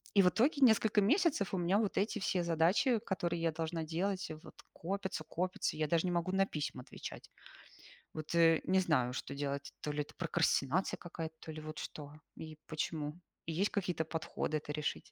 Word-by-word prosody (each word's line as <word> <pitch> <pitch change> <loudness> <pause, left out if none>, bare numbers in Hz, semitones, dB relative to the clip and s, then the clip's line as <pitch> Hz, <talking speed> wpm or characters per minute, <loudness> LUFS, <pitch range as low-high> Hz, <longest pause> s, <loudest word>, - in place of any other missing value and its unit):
И 200 - +8
в 180 - +5
итоге, 280 - +2
несколько 220 -4 +5
месяцев, 285 - +2
у - - +1
меня 175 +3 +2
вот 210 -3 -1
эти 215 +2 +1
все 185 -2 0
задачи, 170 - +3
которые 175 -5 -2
я 165 -1 +2
должна 165 0 -2
делать, 185 +5 -1
э, 155 - -5
вот, - - -12 0.2
копятся, 190 -2 -3
копятся, 180 0 -2
я 155 -1 +1
даже 165 +2 +2
не - - 0
могу 175 +1 0
на 195 0 +4
письма 145 -6 -4
отвечать. - - -9 0.8
Вот, 155 +1 -4
э, 165 -1 +6
не 190 +1 +4
знаю, 130 -9 +2
что - - -4
делать, 140 0 -3
то 150 - -2
ли 145 - -3
это 145 - -8
прокрастинация 165 0 +1
какая-то, 165 -2 -6
то 160 - -8
ли 155 - -7
вот 155 0 -7
что, 145 -1 -7 0.2
и 155 -1 -8
почему, 155 0 -3 0.3
и 165 - -3
есть 195 +6 +2
какие-то 180 -5 0
подходы 160 -1 -2
это 150 0 -6
решить. 150 0 -3
170 Hz, 195 wpm, -34 LUFS, 155-190 Hz, 0.8 s, И